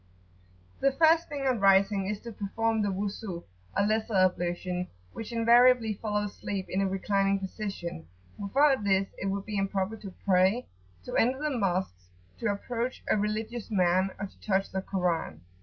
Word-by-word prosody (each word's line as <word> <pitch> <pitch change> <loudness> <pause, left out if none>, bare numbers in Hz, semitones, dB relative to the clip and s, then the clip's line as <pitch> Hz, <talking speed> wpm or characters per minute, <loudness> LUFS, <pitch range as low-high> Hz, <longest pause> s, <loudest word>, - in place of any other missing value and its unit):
The 275 - +3
first 325 +3 +4
thing 280 -2 -4
on 255 -4 +2
rising 195 0 +4
is 210 0 -2
to 235 - -7
perform 225 +2 -1
the 205 - +1
Wuzu, 195 -2 -4 0.3
or 200 - +3
lesser 220 +1 0
ablution, 180 -1 +1 0.3
which 225 +1 -7
invariably 235 0 +5
follows 210 0 -2
sleep 195 -2 -4
in 190 - 0
a 195 - +2
reclining 195 +1 +1
position; 190 - -5 0.3
without 265 +4 +3
this 195 -1 +2
it 195 - -2
would 195 0 -2
be 210 -2 -3
improper 195 +2 -1
to 200 -3 -9
pray, 190 +5 +3 0.4
to - - -5
enter 255 +3 +3
the 300 -1 -2
Mosques, 180 - -1 0.3
to 230 - -1
approach 235 +4 -3
a - - +5
religious 215 +2 -2
man, 185 -2 +2
or 195 - -3
to 195 - -14
touch 195 -1 0
the 190 - -2
Koran. 175 - -2
200 Hz, 165 wpm, -29 LUFS, 190-225 Hz, 0.4 s, invariably